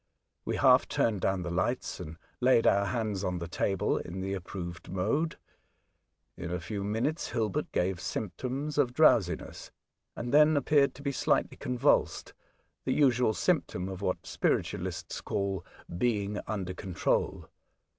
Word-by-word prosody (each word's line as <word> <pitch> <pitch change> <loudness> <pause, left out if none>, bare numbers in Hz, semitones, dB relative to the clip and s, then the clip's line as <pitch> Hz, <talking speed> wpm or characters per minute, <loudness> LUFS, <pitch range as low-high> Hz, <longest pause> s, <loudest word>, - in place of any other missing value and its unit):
We - - -1
half - - +5
turned 105 -5 0
down 95 -2 0
the 85 - -4
lights, 90 +2 -1
and 80 +1 -7 0.2
laid 125 -2 +4
our 100 0 +4
hands 105 -3 -2
on 90 -2 -1
the 85 -1 -5
table 95 +2 0
in 90 +2 -6
the 95 +1 -2
approved 90 -2 -6
mode. 110 - 0 1.0
In 85 - -6
a 90 0 -2
few 100 +4 -4
minutes 115 +11 -1
Hilbert 110 -5 -1
gave 90 0 0
symptoms 130 +10 -3
of 125 -4 +2
drowsiness, 115 - +2 0.5
and 120 +2 -4
then 150 +1 +6
appeared 140 0 +3
to 140 - -11
be 140 - 0
slightly - - +1
convulsed, 125 -1 +1 0.5
the - - 0
usual 125 -6 +3
symptom 90 +1 0
of 95 0 -6
what 90 -2 -2
spiritualists 95 - -2
call 95 -3 -2 0.2
" 85 - -9
being 105 -3 0
under 95 -3 -3
control." 90 -1 -1
100 Hz, 145 wpm, -30 LUFS, 90-125 Hz, 1.0 s, then